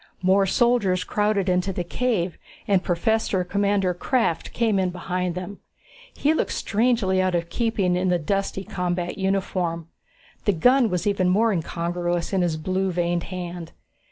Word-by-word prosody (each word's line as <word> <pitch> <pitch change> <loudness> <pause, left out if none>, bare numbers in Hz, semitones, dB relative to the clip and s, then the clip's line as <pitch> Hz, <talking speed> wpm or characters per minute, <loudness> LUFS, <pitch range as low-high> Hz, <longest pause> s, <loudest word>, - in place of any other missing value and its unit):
More 195 +1 +4
soldiers 205 -5 +2
crowded 205 0 0
into 180 +1 +1
the 180 -1 -3
cave, 185 -2 -1 0.3
and 195 -3 +3
Professor 190 +1 0
Commander 200 0 +1
Krafft 175 -3 0
came 220 -4 +1
in 185 -1 +1
behind 180 0 -3
them. 185 +2 -6 0.6
He 300 +2 +2
looked - - -1
strangely 215 -4 +1
out 185 -1 +1
of 170 0 -2
keeping 205 -6 0
in 180 +1 0
the 180 - +3
dusty 195 +3 -2
combat 180 -1 -3
uniform. 185 -4 -1 0.6
The 205 - +3
gun 245 +7 +4
was 180 -2 -2
even 195 -3 +2
more 220 +5 +3
incongruous 175 +1 -2
in 190 - +2
his 170 -3 0
blue 185 +4 -1
veined 175 0 -1
hand. 175 -2 -6
185 Hz, 155 wpm, -24 LUFS, 175-200 Hz, 0.6 s, More